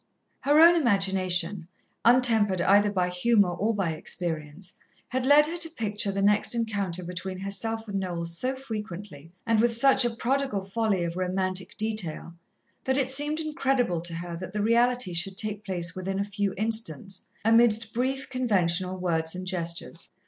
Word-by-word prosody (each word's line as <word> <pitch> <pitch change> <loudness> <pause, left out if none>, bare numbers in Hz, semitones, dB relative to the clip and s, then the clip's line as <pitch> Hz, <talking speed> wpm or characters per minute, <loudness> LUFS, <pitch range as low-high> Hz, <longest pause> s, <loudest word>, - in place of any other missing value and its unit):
Her 290 +2 +3
own 340 +2 +8
imagination, 190 - +1 0.4
untempered 225 -6 +4
either 205 +3 +4
by 180 -3 0
humour 200 +1 +2
or 210 +5 -1
by 190 -5 -1
experience, 160 +2 -5 0.4
had 260 0 -2
led 295 +1 +7
her 335 +3 -4
to 335 -1 +3
picture 210 -8 -1
the 195 0 -2
next 210 +3 +3
encounter 200 -6 -2
between 180 +2 -6
herself 220 +4 -3
and 200 -1 -2
Noel 175 -3 -4
so 210 +11 -2
frequently, 205 - -8
and 225 -1 +2
with 235 +1 +3
such 265 +3 +6
a 240 - +3
prodigal 240 -3 -2
folly 195 -2 -1
of 170 +1 -4
romantic 185 0 -2
detail, 215 -7 -3 0.5
that 265 0 +1
it 265 -1 +1
seemed 295 +3 0
incredible 270 - 0
to 170 -1 -5
her 170 0 -6
that 185 +2 -8
the 210 -1 -1
reality 240 -2 +2
should 185 +3 -2
take 210 -1 -3
place 175 -4 -2
within 190 +1 -4
a - - +1
few 200 -1 -3
instants, 200 -4 -2 0.2
amidst 225 -1 +4
brief, 265 +3 -2
conventional 185 -7 0
words 165 -2 -1
and 185 0 -6
gestures. 170 -1 -4
200 Hz, 165 wpm, -26 LUFS, 180-235 Hz, 0.5 s, own